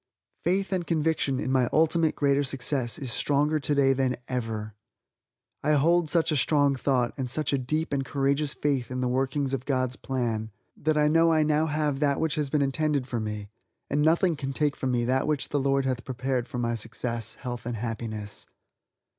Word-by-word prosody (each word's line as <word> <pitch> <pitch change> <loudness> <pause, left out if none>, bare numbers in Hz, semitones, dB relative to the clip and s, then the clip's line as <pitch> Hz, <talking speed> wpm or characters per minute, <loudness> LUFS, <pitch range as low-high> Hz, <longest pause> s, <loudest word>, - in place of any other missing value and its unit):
Faith 190 +3 0
and 180 -2 -1
conviction 155 -4 +1
in 130 - -2
my 130 -2 +2
ultimate 160 0 +2
greater 140 -1 +2
success 130 -2 0
is 135 -6 -4
stronger 145 +5 +2
today 140 -2 +2
than 130 -1 0
ever! 110 -4 -3 0.9
I 150 - +2
hold 165 +3 +3
such 165 0 +2
a - - +1
strong 145 0 +3
thought, 125 -2 0
and 130 -2 -3
such 150 +2 +1
a - - +3
deep 155 +5 -2
and 135 -1 0
courageous 140 +2 0
faith 140 -4 -1
in 130 0 -3
the 125 - +1
workings 135 +2 0
of 130 -1 -3
God's 130 -2 0
plan, 115 -4 -2 0.3
that 155 0 0
I 150 0 +4
know 165 +2 +4
I 155 -1 +4
now 155 +1 +2
have 150 -2 -1
that 145 -2 +1
which 160 -2 0
has 150 -2 -1
been 145 0 +2
intended 140 0 0
for 120 -2 -2
me, 105 -2 -5 0.4
and 145 - +2
nothing 165 +3 +3
can 135 -2 -4
take 145 0 +1
from 130 - -2
me 120 -1 +1
that 130 +3 +1
which 150 -2 -1
the 145 - 0
Lord 135 0 +1
hath 125 -2 -1
prepared 130 -1 -2
for - - -6
my 120 -1 0
success, 115 0 -3
health 120 -2 -6
and 120 - -2
happiness. 110 -2 -5
135 Hz, 195 wpm, -27 LUFS, 125-150 Hz, 0.9 s, I